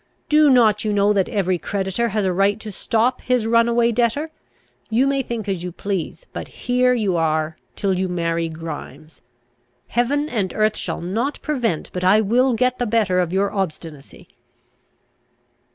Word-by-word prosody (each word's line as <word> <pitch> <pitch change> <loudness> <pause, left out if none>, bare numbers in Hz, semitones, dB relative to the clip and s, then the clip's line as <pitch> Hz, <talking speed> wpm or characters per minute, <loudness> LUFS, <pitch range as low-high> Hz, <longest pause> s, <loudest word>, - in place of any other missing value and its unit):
Do 300 -1 +5
not 220 -5 +4
you 215 - 0
know 205 +1 +3
that 195 -2 +1
every 185 -3 0
creditor 195 +5 -1
has 210 -1 -1
a 185 - +1
right 200 +3 +2
to 215 - -6
stop 230 +5 0
his 250 -3 0
runaway 235 +1 +3
debtor. 245 +7 0 0.6
You 235 +4 +2
may 275 0 +1
think 235 -4 -5
as 190 -3 -2
you 180 - -4
please; 195 - -4
but - - -6
here 250 0 +1
you 200 -7 0
are 155 -1 0 0.2
till 195 -2 0
you 190 - 0
marry 165 -2 -1
Grimes. 160 -1 -9 0.7
Heaven 280 +5 0
and 205 -9 -2
earth 215 0 +2
shall - - -4
not 225 +11 -2
prevent 245 - -2
but 180 - -4
I 190 +4 +5
will 240 +5 +2
get 255 +1 +1
the 245 - 0
better 210 -5 +2
of 175 -2 0
your 195 +2 +1
obstinacy!" 160 -7 -5
210 Hz, 170 wpm, -21 LUFS, 180-240 Hz, 0.7 s, Do